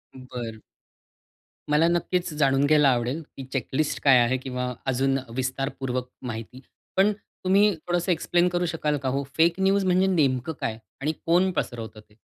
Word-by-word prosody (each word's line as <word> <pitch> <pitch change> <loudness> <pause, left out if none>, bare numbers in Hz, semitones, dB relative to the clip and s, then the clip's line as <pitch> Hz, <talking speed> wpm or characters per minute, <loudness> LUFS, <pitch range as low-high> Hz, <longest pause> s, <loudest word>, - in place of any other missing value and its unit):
बरं. 125 -4 -7 1.1
मला 155 +3 +4
नक्कीच 175 -1 0
जाणून 140 -1 +2
घ्यायला 150 -2 +5
आवडेल 125 +5 0 0.2
ही 135 - -6
चेकलिस्ट 135 +3 -1
काय 135 -3 +7
आहे 125 +2 +2
किंवा 125 -1 -4
अजून 135 +1 +1 0.2
विस्तारपूर्वक 130 -1 -3
माहिती, 120 +1 -7 0.4
पण 200 +2 +5
तुम्ही 200 0 +1
थोडंसं 175 +1 +1
एक्सप्लेन 175 +1 +2
करू 175 0 0
शकाल 155 -3 -1
का 135 -1 -2
हो 140 - -1
फेक 170 +3 +3
न्यूज 195 0 +2
म्हणजे 185 +1 +3
नेमकं 145 -4 +1
काय? 110 -1 -2 0.2
आणि 150 - +1
कोण 180 +3 +3
पसरवत 115 -5 -4
ते? 105 0 -16
140 Hz, 150 wpm, -25 LUFS, 125-175 Hz, 1.1 s, काय